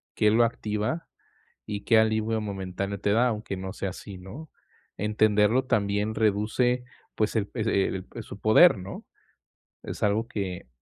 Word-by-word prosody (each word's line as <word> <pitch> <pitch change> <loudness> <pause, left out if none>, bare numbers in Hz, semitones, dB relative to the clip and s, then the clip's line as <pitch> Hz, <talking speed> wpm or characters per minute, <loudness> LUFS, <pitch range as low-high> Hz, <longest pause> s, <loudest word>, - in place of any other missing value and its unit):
qué 105 - +4
lo 115 +2 +5
activa 110 +7 -2 0.6
y 100 -1 -4
qué 115 -2 +5
alivio 110 0 +1
momentáneo 100 -1 -4
te 100 - 0
da, 120 +4 +4
aunque 105 -4 -3
no 95 0 -5
sea 100 -2 -3
así, 95 +1 -9
¿no?, 110 +13 -10 0.5
entenderlo 105 +3 +2
también 105 -2 0
reduce, 110 +4 +1 0.3
pues 110 +1 0
el 100 -1 -1
e 110 -4 +1 0.2
el 115 - -8
su 100 - -10
poder, 110 - +6
¿no?, 95 +2 -8 0.8
es - - -7
algo 105 +3 +1
que, 95 - -4
105 Hz, 150 wpm, -27 LUFS, 100-115 Hz, 0.8 s, poder